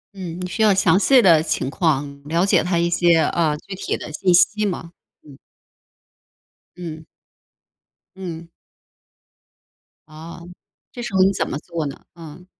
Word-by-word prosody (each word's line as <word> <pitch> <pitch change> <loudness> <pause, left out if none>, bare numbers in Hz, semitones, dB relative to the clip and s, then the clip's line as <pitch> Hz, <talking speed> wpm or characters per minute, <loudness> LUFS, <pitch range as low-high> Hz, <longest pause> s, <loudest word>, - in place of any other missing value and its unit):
嗯， 180 -2 -7
你 180 - -4
需 180 +5 -4
要 215 -2 +5
详 185 -1 +3
细 265 +5 +5
的 165 -5 +6
情 140 -4 -2
况， 140 -4 -1
了 170 +5 +1
解 - - +3
他 175 -1 0
一 170 - +1
些， 170 -1 +3
呃， 160 -2 +1
具 195 - -10
体 190 - -3
的 - - -9
信 185 +3 +1
息 210 +4 +3
吗？ 170 -4 -3 0.4
嗯。 140 - -14 1.4
嗯。 160 -3 -8 1.1
嗯。 170 -3 -7 1.6
哦， 165 +3 -11 0.4
这 245 - -8
时 240 -4 -6
候 190 - +3
你 195 - +4
怎 - - -2
么 - - -3
做 165 -1 -5
呢？ 140 - -9
嗯。 165 +1 -12
170 Hz, 160 characters per minute, -21 LUFS, 160-190 Hz, 1.6 s, 的